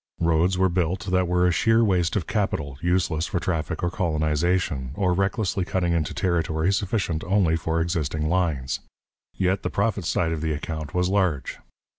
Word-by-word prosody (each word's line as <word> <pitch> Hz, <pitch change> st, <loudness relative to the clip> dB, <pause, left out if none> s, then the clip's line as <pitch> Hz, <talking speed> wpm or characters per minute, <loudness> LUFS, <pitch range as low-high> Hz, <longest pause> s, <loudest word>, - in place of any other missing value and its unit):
Roads 85 Hz, +2 st, +2 dB
were 95 Hz, 0 st, +4 dB
built 90 Hz, 0 st, -1 dB
that 90 Hz, -1 st, +2 dB
were 90 Hz, +1 st, +2 dB
a 90 Hz, -, +4 dB
sheer 115 Hz, +5 st, +3 dB
waste 90 Hz, -5 st, +1 dB
of 95 Hz, -6 st, 0 dB
capital, 90 Hz, -, -2 dB
useless 85 Hz, -2 st, +1 dB
for 90 Hz, -, -1 dB
traffic 80 Hz, -4 st, -2 dB
or 85 Hz, -, +1 dB
colonization, 80 Hz, -4 st, 0 dB
or 95 Hz, -3 st, +1 dB
recklessly 95 Hz, +1 st, 0 dB
cutting 90 Hz, -1 st, 0 dB
into 80 Hz, -3 st, 0 dB
territory 85 Hz, 0 st, 0 dB
sufficient 95 Hz, -4 st, -1 dB
only 90 Hz, -4 st, +2 dB
for 80 Hz, 0 st, -1 dB
existing 80 Hz, -2 st, -1 dB
lines. 80 Hz, -7 st, 0 dB, 0.6 s
Yet 95 Hz, +1 st, +1 dB
the -, -, -2 dB
profits 100 Hz, -4 st, -1 dB
side 80 Hz, -2 st, +1 dB
of 80 Hz, -2 st, -2 dB
the 80 Hz, -1 st, 0 dB
account 75 Hz, +2 st, -5 dB
was 90 Hz, 0 st, +2 dB
large. 95 Hz, -7 st, 0 dB
90 Hz, 170 wpm, -24 LUFS, 80-95 Hz, 0.6 s, were